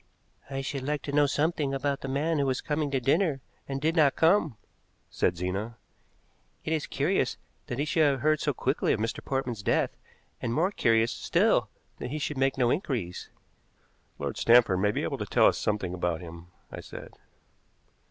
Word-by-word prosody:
"I 135 -1 -3
should 135 0 -4
like 145 +2 -2
to 140 - -4
know 145 0 +4
something 145 -1 0
about 140 +1 -1
the - - -5
man 150 +4 0
who 140 - +1
was 130 -1 0
coming 150 -1 -1
to 135 -1 0
dinner 145 +3 +1 0.3
and 135 0 -2
did 160 +4 0
not 150 -5 +4
come," 160 - +3 0.5
said 90 -1 0
Zena. 95 +6 -3 0.9
"It 160 - 0
is 155 - -1
curious - - 0 0.3
that 120 - -4
he 145 - 0
should 160 +1 +1
have 140 -4 +3
heard 155 +1 +3
so 145 - 0
quickly 135 +1 0
of - - -2
Mr. 115 +1 -3
Portman's 130 -5 -2
death, - - +1 0.5
and 115 - -2
more 180 +5 +2
curious 115 - +2
still - - +2 0.3
that 125 - -5
he 150 - -3
should 150 -2 -3
make 135 0 +1
no 125 -2 +3
inquiries." 120 - -3 0.9
"Lord - - -4
Stanford 115 -6 +5
may 105 +2 +2
be - - -1
able - - -3
to - - -2
tell - - +4
us - - +4
something 105 -4 -1
about 90 -2 -1
him," 85 0 -10 0.2
I - - -7
said. - - -10
135 Hz, 190 wpm, -28 LUFS, 115-150 Hz, 0.9 s, Stanford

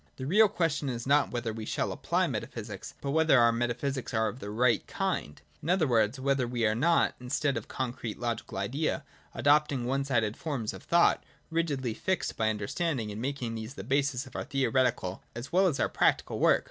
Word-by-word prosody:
The 130 - -6
real 205 +8 +5
question 165 -7 0
is 120 -2 -4
not 145 +2 +3
whether 120 -2 -3
we 110 0 -6
shall - - -1
apply - - 0
metaphysics, - - -5
but 140 - -2
whether 160 -3 +5
our 120 0 +6
metaphysics 120 +3 -2
are 110 0 +2
of 115 +4 -5
the 100 - -6
right 115 +1 +2
kind: 190 - -2 0.2
in 155 - -5
other 180 -3 +3
words, 120 -1 +2
whether 135 -2 +1
we 120 -1 0
are 110 - +3
not, 165 +9 +3
in 125 0 -9
stead 140 +1 +1
of - - -4
the - - -12
concrete 125 -4 -3
logical 120 -4 -3
Idea, 140 +10 -1 0.3
adopting 145 -3 +3
one 135 +2 0
sided 115 -6 0
forms 130 -9 -3
of - - -9
thought, 170 0 +3 0.3
rigidly 145 -8 -1
fixed 190 +11 -1
by 110 -1 +1
understanding, 110 - -2
and 105 +2 -6
making 130 -3 -3
these 110 +3 -6
the 95 - -7
basis 135 +2 0
of 130 - -14
our - - -2
theoretical 130 -8 0
as 120 +3 -7
well 190 +2 +4
as 150 -6 0
our - - +3
practical - - +1
work. - - +5
130 Hz, 205 wpm, -29 LUFS, 115-145 Hz, 0.3 s, our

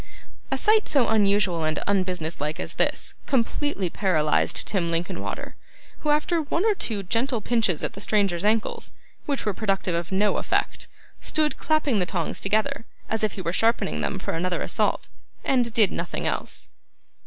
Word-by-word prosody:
A - - 0
sight 430 0 +3
so 275 -5 +3
unusual 200 -5 +3
and 155 -1 0
unbusiness 180 -5 -1
like 150 +3 -2
as - - -4
this, - - 0
completely 260 -4 0
paralysed 160 -5 +1
Tim 180 -5 0
Linkinwater, 170 +1 -3 0.4
who, 300 - -2
after 305 +3 +2
one 330 +6 -1
or 440 - +5
two 220 - -2
gentle 235 +6 0
pinches 220 -7 +1
at - - -2
the 200 - -7
stranger's 200 -5 +2
ankles, 215 +1 0 0.3
which 280 -2 -1
were 210 - +1
productive 195 -3 0
of 170 +1 -2
no 200 +2 +2
effect, - - -1 0.3
stood 305 -1 0
clapping 300 -8 +2
the 180 - 0
tongs 175 -4 -2
together, 220 +6 0 0.3
as 220 0 0
if 215 - +1
he 190 - -6
were 170 - -1
sharpening 225 - +1
them 70 -2 -1
for - - -3
another 175 +2 -1
assault, - - 0 0.4
and 245 -3 +2
did 215 -3 +4
nothing 170 0 -3
else. - - -2
205 Hz, 165 wpm, -25 LUFS, 175-240 Hz, 0.4 s, or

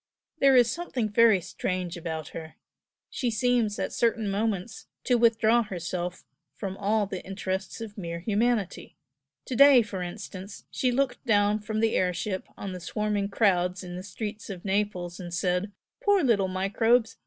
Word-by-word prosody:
There 275 -1 +6
is 240 -2 +5
something 260 -9 -2
very 220 -1 +5
strange 180 +1 -3
about 160 -3 -5
her 160 -1 -8 0.6
she 245 - -1
seems, 230 -2 +1
at - - -3
certain 225 -3 +1
moments, 210 0 -2 0.2
to 250 - +1
withdraw 230 -1 +4
herself 180 -3 -4 0.3
from 195 -2 -5
all 210 +1 +1
the 190 -2 -6
interests 190 +1 -4
of 215 -2 -7
mere 170 -2 -4
humanity. 215 0 -1 0.5
To 255 - -4
day, 275 -1 +8
for 200 -3 -6
instance, 190 +2 -7
she 255 - +1
looked 245 -1 0
down 205 -1 +3
from 215 +1 -3
the 225 0 +2
air 180 -1 +1
ship 190 -1 -3
on 195 - -5
the 180 - -6
swarming 205 +2 -1
crowds 185 -3 +1
in 180 -1 -7
the 180 - -5
streets 205 +2 -6
of 185 -2 -7
Naples 190 -3 -1
and 175 -2 -7
said 180 +3 0 0.3
'Poor 405 -3 +4
little 210 -7 +3
microbes! 220 +5 +1
205 Hz, 165 wpm, -27 LUFS, 185-225 Hz, 0.6 s, day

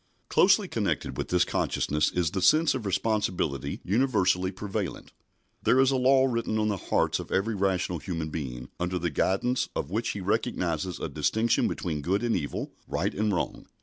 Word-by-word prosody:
Closely - - +4
connected - - -2
with - - -3
this 90 -1 +3
consciousness 75 +1 0
is 90 -2 0
the 95 -1 -2
sense 155 - +5
of 115 -6 -3
responsibility 90 - -1
universally 95 -5 +2
prevalent. 100 -1 -5 0.5
There 130 - +3
is 135 0 +5
a - - +1
law 130 +1 +4
written 115 -3 -1
on 110 0 +1
the 100 - -1
heart - - +2
of - - -8
every 105 +4 +1
rational 95 -3 0
human 80 +1 -4
being, 65 -5 -5
under 90 +1 -1
the 85 -2 -2
guidance 120 - 0
of - - -3
which 115 +4 -1
he 105 - -5
recognises 90 -5 -1
a - - -3
distinction 115 +1 +1
between 80 -4 -3
good 95 +8 0
and 120 -1 +1
evil, 75 -5 -3
right - - -1
and 105 +1 0
wrong. 90 - -3
95 Hz, 180 wpm, -27 LUFS, 85-115 Hz, 0.5 s, sense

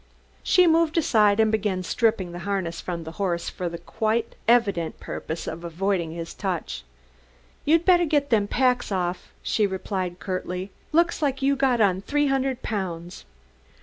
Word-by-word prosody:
She 365 -1 +5
moved 330 -1 +3
aside 215 -9 +4
and 220 -1 +4
began 205 -4 0
stripping 215 -3 +1
the 175 - -7
harness 185 -3 -2
from 170 -2 -4
the 160 - -7
horse 175 -3 -1
for 180 -1 -3
the 170 - -6
quite 225 +5 -1
evident 205 -9 +2
purpose 160 +1 -5
of 170 - -6
avoiding 175 0 -1
his 165 0 -6
touch. 180 - -3 0.8
"You'd 330 +3 +3
better 350 -2 +5
get 290 -3 +1
them 210 -3 +3
packs 250 0 +1
off," 180 -1 -2
she 210 -2 +2
replied, 190 -2 -3
curtly. 185 0 -4 0.2
"Looks 340 +1 +2
like 275 -2 0
you'd 275 0 +2
got 255 -4 +3
on 190 -2 +3
three 290 +7 +1
hundred 270 -2 0
pounds." 180 -5 -4
205 Hz, 160 wpm, -25 LUFS, 180-265 Hz, 0.8 s, She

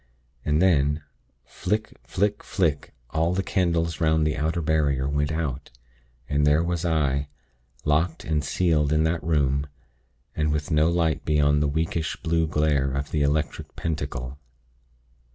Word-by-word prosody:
And 75 0 +1
then, 75 -4 +2 0.4
flick! 105 +4 -2
flick! 100 +2 -1
flick! 80 -7 -1 0.2
all 80 +3 +1
the 95 - 0
candles 85 -4 0
'round 80 -1 +3
the 75 - 0
outer 80 +3 -1
barrier 70 -4 +1
went 75 +1 0
out; 75 -4 -3 0.6
and 75 +2 +1
there 75 +2 +4
was 85 -1 -2
I, 70 -4 +1 0.6
locked 80 +3 +1
and 75 -2 0
sealed 75 -2 +1
in 80 0 +3
that 80 +1 0
room, 70 -3 +1 0.7
and 75 -1 +1
with 75 +2 -2
no 75 +1 +4
light 85 -3 +1
beyond 75 -1 +3
the 75 - +2
weakish 80 +1 -1
blue 80 0 +1
glare 75 -3 +1
of 70 +1 -3
the 75 - 0
Electric 75 +1 -1
Pentacle. 70 -4 -4
75 Hz, 145 wpm, -25 LUFS, 75-80 Hz, 0.7 s, there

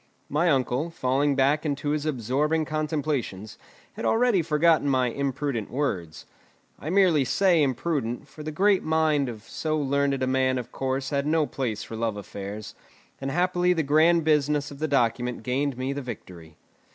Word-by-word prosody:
My 160 +5 +2
uncle, 135 +2 +1
falling 140 -2 0
back 140 +3 +2
into 145 -1 -2
his 150 0 -1
absorbing 150 +4 0
contemplations, 150 - -3 0.3
had - - -7
already 225 -5 +3
forgotten 160 -1 +3
my 130 -2 +2
imprudent 135 -3 -2
words. 95 - -3 0.5
I 155 - -5
merely 180 -6 +4
say 175 +4 +3
imprudent, 135 -2 -1
for 150 - -12
the 155 +1 -5
great 195 +4 +3
mind 155 -4 +1
of 110 -3 -8
so 155 +5 -2
learned 140 -1 0
a - - +3
man 130 0 +1
of 125 - -6
course 135 +1 -2
had 140 0 0
no 155 0 +2
place 125 -7 -3
for 115 - -8
love 110 -2 -2
affairs, 100 +1 -7 0.5
and 135 - -3
happily 180 +3 +2
the 165 -2 0
grand 160 +4 +4
business 150 -1 +1
of 140 - -10
the 155 - 0
document 125 -3 0
gained 135 +1 -1
me 130 +2 -2
the 140 - -4
victory. 90 - -9
140 Hz, 165 wpm, -26 LUFS, 125-155 Hz, 0.5 s, merely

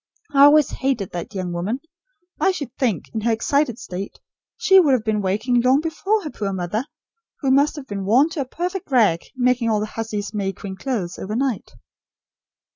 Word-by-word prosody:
I 280 0 +8
always 295 -1 +5
hated 255 -8 -2
that 175 +4 -6
young 180 -2 -3
woman! 195 +9 -2 0.6
I 385 - +3
should 285 -9 -4
think, 225 - -1
in 220 - -2
her 230 +2 +1
excited 240 +2 +1
state, 195 -5 -7 0.4
she 385 -5 +6
would 300 -7 +4
have 245 -4 +1
been 215 -1 0
waking 215 +6 +1
long 255 +3 +4
before 380 +7 -1
her 300 - -5
poor 200 -2 -3
mother, 190 +6 -2 0.6
who 270 -3 +1
must 285 +3 +3
have 290 -3 -7
been 200 -5 -5
worn 240 +10 +4
to 320 -3 -3
a - - -2
perfect 355 +7 -4
rag, 215 -11 +3
making 250 -2 +2
all 215 -1 +2
the 210 - -1
hussy's 215 -1 -5
May 195 -2 -2
Queen 190 +1 -7
clothes, 190 -4 -3
overnight." 235 +3 -2
235 Hz, 190 wpm, -22 LUFS, 205-280 Hz, 0.6 s, I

